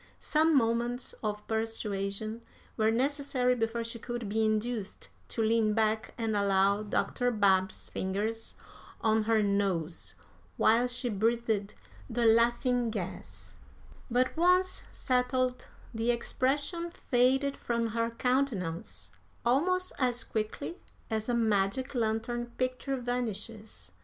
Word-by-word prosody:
Some 310 0 +3
moments 240 +1 0
of 210 -1 -3
persuasion 220 -1 -2 0.3
were 220 -1 +3
necessary 260 +1 +1
before 230 -1 -1
she 230 0 -6
could 240 -1 -4
be 220 +2 +1
induced 215 -1 -1 0.2
to 225 - -1
lean 220 -1 +2
back 220 0 0
and 225 -2 -1
allow 200 0 +3
Dr. 245 +4 0
Babb's 190 -4 +2
fingers 210 +4 -2 0.5
on 220 -1 +2
her 220 -1 +3
nose 195 -5 -1 0.4
while 235 +3 +4
she 245 0 -2
breathed 220 -1 0 0.3
the 235 0 0
laughing 235 +2 +3
gas; 195 -5 -6 0.5
but, 250 +2 +1
once 365 +2 +3
settled, 255 0 0 0.3
the 225 +1 -1
expression 285 +8 0
faded 270 -2 +2
from 235 -1 -1
her 230 +1 0
countenance 185 - -1 0.3
almost 365 +9 +2
as 245 -3 +1
quickly 220 +10 -3 0.3
as 220 +1 -1
a 240 - +2
magic 225 +4 +1
lantern 235 0 -1
picture 255 +2 -1
vanishes. 230 - -4
230 Hz, 115 wpm, -30 LUFS, 215-250 Hz, 0.5 s, while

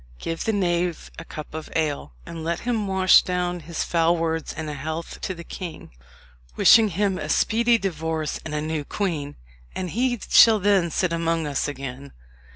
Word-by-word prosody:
Give 165 - -4
the 225 - +1
knave 175 -4 -1
a - - -7
cup 155 -1 -9
of 160 0 -6
ale, 145 - -2
and 165 -1 -7
let 170 +1 -2
him 230 -4 -1
wash 190 -1 +6
down 180 -1 -2
his 165 +1 -4
foul 170 0 +2
words 165 -1 -2
in 160 -1 -6
a 150 - -4
health 160 +4 -6
to 190 - -3
the 170 - -9
king, 175 -1 -8 0.6
wishing 225 - +7
him 195 0 0
a - - -5
speedy 235 +1 +3
divorce 160 -6 -3
and 155 -1 -5
a 150 - -1
new 155 -1 -2
queen, 150 -5 -3 0.4
and 185 -2 -3
he 245 0 0
shall 225 -2 +7
then 195 -3 +2
sit 175 +1 0
among 165 -1 0
us 145 -1 -1
again." 140 -1 -7
170 Hz, 180 wpm, -24 LUFS, 155-190 Hz, 0.6 s, wishing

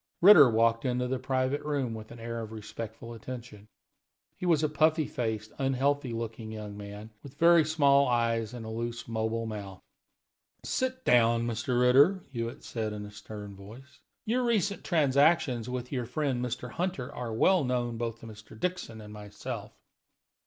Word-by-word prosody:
Ritter 175 -8 +9
walked 115 0 +2
into 125 -1 0
the 130 0 -2
private 130 +2 0
room 140 -6 -2
with 110 -1 -8
an 120 - -11
air 115 0 -4
of 110 -1 -7
respectful 110 +1 -7
attention. 115 -3 -9 0.7
He 180 - -4
was 160 -3 +3
a - - +4
puffy 155 +1 +2
faced, 110 -4 -3
unhealthy 135 0 +1
looking 115 -1 -5
young 105 -2 -7
man, 105 +1 -9
with 140 0 -13
very 170 0 +6
small 140 -3 +4
eyes 115 -2 +1
and 120 -2 -7
a - - -6
loose, 115 +1 -4
mobile 115 0 -2
mouth. 100 -4 -6 0.9
"Sit 260 0 -2
down, 115 -1 +4
Mr. 120 +2 -1
Ritter," 140 +10 +5
Hewitt 115 -2 -5
said, 110 -2 -3
in 105 0 -6
a 105 - -10
stern 105 -1 -9
voice. 120 +9 -13 0.3
"Your 245 +3 +1
recent 210 -4 0
transactions 140 - +3
with 125 0 -4
your 125 -4 -2
friend 130 -1 -1
Mr. 125 0 -4
Hunter 170 -8 -3
are 120 -2 -5
well 175 +10 +3
known 120 -2 -1
both 115 -1 -4
to - - -10
Mr. 110 0 -12
Dixon 175 -11 -3
and 105 0 -10
myself." 105 -1 -7
120 Hz, 165 wpm, -29 LUFS, 110-140 Hz, 0.9 s, Ritter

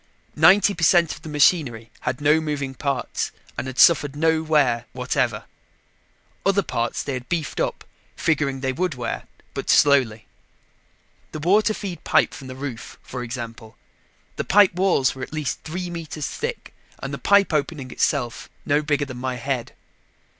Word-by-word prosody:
Ninety 200 +1 +6
per 170 - -5
cent 170 -1 +4
of 155 - -12
the 160 - -9
machinery 140 -6 +2
had 125 - -3
no 150 +2 +4
moving 145 -3 -3
parts 135 -2 -2 0.2
and - - -4
had 130 -1 -7
suffered 145 -4 +5
no 160 +1 +2
wear 140 -7 +2
whatever. - - -1 1.0
Other 195 0 +2
parts 115 -7 -2
they 140 - -3
had 125 -1 -6
beefed 165 -5 -2
up, - - -1 0.3
figuring 140 -4 0
they 130 -1 -1
would 180 +2 -1
wear, 120 -2 -4 0.3
but - - -5
slowly. 125 -7 +4 1.1
The 155 - -4
water 205 +7 +3
feed 180 -6 -6
pipe - - +3
from 135 - -9
the 130 - -7
roof, 130 -4 -7
for 125 - -6
example. 115 -2 -7 0.6
The - - -1
pipe 200 -2 +5
walls 180 -8 +2
were 130 - -10
at 130 - -6
least 155 -4 -3
three 175 +2 -5
meters 160 -3 -5
thick 470 +1 -5 0.2
and - - -6
the - - -4
pipe 200 -3 +4
opening 145 -3 -2
itself 120 -2 -1 0.2
no 145 +1 +2
bigger 145 -1 0
than 130 -3 -8
my 130 0 -3
head. 125 0 -3
145 Hz, 165 wpm, -23 LUFS, 130-165 Hz, 1.1 s, Ninety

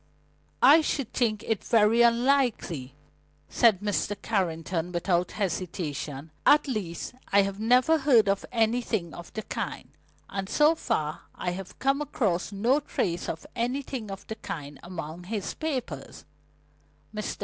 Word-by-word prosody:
"I 295 +5 +8
should 275 -5 -2
think 215 -4 0
it 220 -3 -1
very 225 +1 +4
unlikely," 235 - +2 0.5
said 220 -5 +4
Mr. 205 0 -1
Carrington 175 -4 -1
without 175 0 0
hesitation. 160 -6 -3
"At 295 0 +5
least, 200 -7 -4 0.2
I 200 0 +6
have 195 0 -4
never 250 +8 +4
heard 250 -7 +5
of 195 0 +1
anything 225 -6 0
of 170 0 -10
the 220 - -4
kind, - - -5 0.4
and 195 -1 -4
so 300 +2 +5
far 155 - -2
I 180 - -2
have 185 +1 -7
come 275 +2 +1
across 205 -11 -1
no 235 +8 +2
trace 175 - -2
of 160 - -5
anything 250 -1 -2
of 195 -1 -7
the 220 - -6
kind 145 -7 -7
among 170 -1 -7
his 205 0 -3
papers." 255 - -5
205 Hz, 135 wpm, -27 LUFS, 175-245 Hz, 0.5 s, I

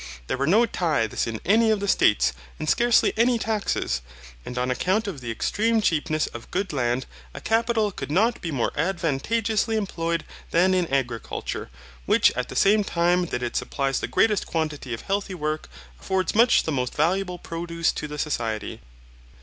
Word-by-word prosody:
There 130 - -2
were 140 +1 0
no 215 +8 +5
tithes 160 - 0
in 110 -1 -4
any 220 +4 +4
of 215 -2 +2
the 200 - -3
States, 105 - +3 0.2
and 155 - -5
scarcely 240 +6 +3
any 235 +2 +3
taxes. 210 - -1 0.4
And 125 - -7
on 125 +1 0
account 190 - 0
of 170 -9 -5
the 120 - -6
extreme 220 - +1
cheapness 155 -5 +1
of 120 - -9
good 195 -2 -2
land 125 -1 0 0.3
a - - -5
capital 225 -2 +1
could - - -6
not 220 +10 +2
be 170 - -3
more 135 -6 0
advantageously 195 - 0
employed 170 -5 -2 0.2
than 185 +3 +3
in 180 -4 0
agriculture, 125 - -3 0.4
which - - +5
at 125 0 -4
the - - -7
same 210 +1 +4
time 175 0 +1
that 125 -5 -3
it 120 - -3
supplies 135 -1 -1
the - - -3
greatest 215 -3 +2
quantity 155 -5 -3
of - - -10
healthy 195 -1 -2
work 155 -1 -3 0.3
affords 185 - -1
much 235 +3 +5
the 160 - -2
most 125 -3 -2
valuable 180 +4 0
produce 170 0 -2
to 150 - -5
the 150 0 -7
society. 115 -7 -3
170 Hz, 175 wpm, -24 LUFS, 135-205 Hz, 0.4 s, no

